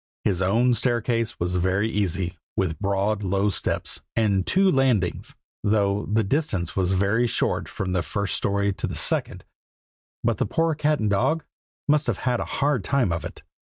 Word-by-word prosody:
His 95 -3 +1
own 115 +7 +3
staircase 115 -1 0
was 90 +1 0
very 95 +4 +1
easy, 95 -4 -1 0.2
with 80 -5 -1
broad 100 +1 0
low 100 +1 +1
steps, 100 - -1
and 100 -4 +1
two 195 +1 +4
landings, 125 -10 +1 0.3
though 100 -1 +1
the 110 +1 +3
distance 95 - -1
was 95 -1 +1
very 100 +5 +2
short - - 0
from 95 -1 -3
the 90 - +1
first 100 +3 -2
story 100 0 0
to - - -3
the - - -5
second; - - 0 0.8
but - - +1
the - - +1
poor 165 0 +1
cat 150 0 +1
and 105 -1 0
dog 155 +11 +1 0.4
must 150 0 +3
have 115 -6 0
had 125 -1 +1
a - - -2
hard 140 -6 0
time 130 -4 +1
of 85 -1 -2
it. - - -8
105 Hz, 175 wpm, -24 LUFS, 95-120 Hz, 0.8 s, two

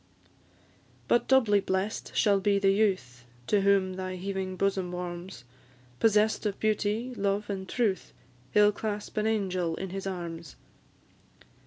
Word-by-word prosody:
But 240 - +2
doubly 230 -6 +4
bless'd 190 +2 -2
shall 200 -3 +3
be 200 +1 +2
the 195 -1 +3
youth 185 - 0 0.2
To 205 +9 +2
whom 195 -1 +3
thy 185 0 -4
heaving 190 0 -4
bosom 190 -2 0
warms; 175 -5 -6 0.6
Possess'd 215 0 +3
of 200 - -4
beauty, 215 +3 0
love, 200 0 -1
and 190 -1 -5
truth, 220 -6 -1 0.4
He - - +3
'll 210 0 +6
clasp 210 0 -5
an 215 +1 +1
angel 185 -6 0
in 190 +1 -5
his 195 0 -4
arms. 170 -3 -6
195 Hz, 140 wpm, -28 LUFS, 185-210 Hz, 0.6 s, ll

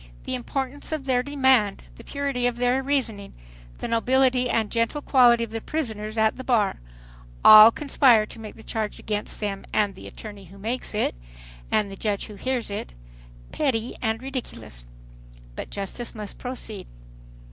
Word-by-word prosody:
The - - -4
importance 265 +3 -3
of 310 -4 -3
their 255 -2 +2
demand, 260 -7 +2
the - - -13
purity 280 -4 -1
of 245 -1 -2
their 250 +2 +2
reasoning, 245 -8 -2 0.4
the - - -4
nobility 250 +2 +2
and 220 -3 0
gentle 235 +6 -1
quality 240 -3 +5
of 230 - -6
the 225 0 -4
prisoners 220 -8 -4
at 220 0 +2
the 260 - -6
bar; 225 -6 +1 0.7
all 215 +1 +11
conspire 250 -4 +3
to 225 - -12
make 215 -1 -9
the 220 - -14
charge 220 -2 -3
against 210 -1 -4
them, 200 -2 -3
and 205 -2 +1
the - - -11
attorney 205 -3 -10
who 190 +3 -15
makes 225 +3 -3
it, 210 - +1 0.6
and 205 -2 +1
the - - -7
judge 205 0 -2
who 210 - -10
hears 245 +1 -2
it, 200 - -5 0.6
petty 245 -5 -1
and 225 +1 -1
ridiculous. 115 - -7 0.7
But - - -6
justice 205 +5 -3
must 210 -2 -6
proceed. 235 -5 -6
230 Hz, 165 wpm, -25 LUFS, 210-260 Hz, 0.7 s, all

